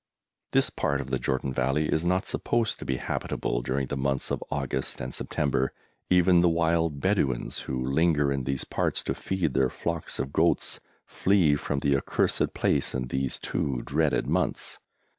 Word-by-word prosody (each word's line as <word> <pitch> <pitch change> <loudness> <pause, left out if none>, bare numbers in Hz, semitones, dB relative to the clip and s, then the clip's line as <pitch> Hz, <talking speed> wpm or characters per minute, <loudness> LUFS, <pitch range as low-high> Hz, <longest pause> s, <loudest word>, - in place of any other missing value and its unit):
This - - +3
part - - 0
of 65 - -6
the 65 - +1
Jordan 65 0 -1
Valley 65 +4 +1
is 80 - +1
not 90 +2 +1
supposed 115 -2 0
to - - -7
be 65 - -1
habitable - - -2
during 65 +2 -1
the 70 - -4
months 70 0 -1
of - - -1
August 70 -3 -2
and 60 +1 -5
September. 70 -2 -1 0.4
Even 90 -1 +5
the 90 - +5
wild 80 -2 +1
Bedouins, 70 -9 0
who 65 -1 -1
linger 75 +1 +2
in 70 -2 -1
these 70 0 0
parts - - -1
to - - -1
feed 90 -7 -1
their 65 -1 +3
flocks - - -4
of 65 +2 -3
goats, - - +1 0.3
flee 95 -6 +3
from 70 -1 -2
the 70 -1 +3
accursed 70 - 0
place - - +1
in 65 -1 -2
these 65 0 -1
two 65 -4 -2
dreaded 75 +1 +1
months. - - -1
70 Hz, 175 wpm, -27 LUFS, 65-80 Hz, 0.4 s, Even